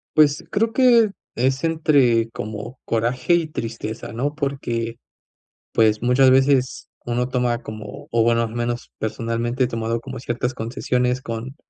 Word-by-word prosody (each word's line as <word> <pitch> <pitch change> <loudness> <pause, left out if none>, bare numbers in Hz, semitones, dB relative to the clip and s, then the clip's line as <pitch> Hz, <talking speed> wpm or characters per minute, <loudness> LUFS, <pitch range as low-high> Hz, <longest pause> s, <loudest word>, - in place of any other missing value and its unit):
Pues 150 -1 +4
creo 225 +2 +1
que, 235 -4 +5 0.3
es 130 +4 +1
entre 140 -8 +3
como 110 +4 -7
coraje 120 +8 +1
y 170 -2 +2
tristeza, 115 -7 -5
¿no? 140 +6 -2
Porque 120 -6 -3 0.8
pues, 110 -1 +3
muchas 130 +2 +5
veces, 130 -1 +3 0.2
uno 120 +1 -1
toma 125 -1 0
como, 110 -1 -8
o 115 - +3
bueno, 115 0 +3
al 110 - -4
menos 120 0 -3
personalmente, 115 +3 -1
he 125 - +2
tomado 115 -1 -2
como 130 +1 -8
ciertas 120 +1 -2
concesiones 125 +2 -1
con, 120 +3 -6
120 Hz, 145 wpm, -22 LUFS, 115-135 Hz, 0.8 s, que